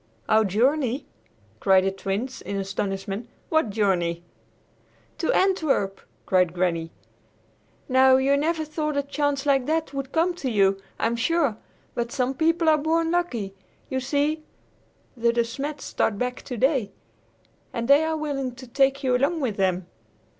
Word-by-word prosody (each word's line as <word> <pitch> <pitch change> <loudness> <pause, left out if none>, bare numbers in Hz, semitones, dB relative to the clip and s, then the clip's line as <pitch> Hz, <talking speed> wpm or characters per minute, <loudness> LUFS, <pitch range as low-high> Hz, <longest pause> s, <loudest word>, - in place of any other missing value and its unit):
"Our 220 0 +4
journey!" 260 +6 +1 0.5
cried 190 -1 +4
the 195 - +1
Twins 195 +7 -4
in 200 - -5
astonishment. 195 +2 -3 0.2
"What 315 -8 +2
journey?" 180 -5 0 1.0
"To 325 - +1
Antwerp," 310 - +1 0.2
cried 180 -2 +2
Granny. 170 -2 0 1.0
"Now, 260 0 +6
you 270 +1 +3
never 315 +2 0
thought 305 -1 -2
a 285 - +1
chance 285 0 -1
like 270 -3 +2
that 315 -1 -1
would 275 -1 -4
come 335 +2 +2
to 275 -7 -2
you, 195 -3 +3 0.2
I'm 230 +1 0
sure, 275 0 +1 0.4
but 235 0 -2
some 260 -1 0
people 330 +3 +1
are 310 -1 +5
born 325 +2 +1
lucky! 245 - -1 0.4
You 260 - 0
see 290 +4 0 0.7
the 235 -1 +2
De 235 0 +2
Smets 275 +5 -5
start 210 - 0
back 250 +2 -2
today, 255 -2 0 0.8
and 235 -1 -3
they 280 +3 +6
are 320 0 -1
willing 275 -5 -3
to 260 +1 -10
take 270 +2 +1
you 255 -1 +2
along 280 +6 +1
with 245 -8 -2
them!" 185 -2 +1
260 Hz, 150 wpm, -25 LUFS, 205-295 Hz, 1.0 s, Now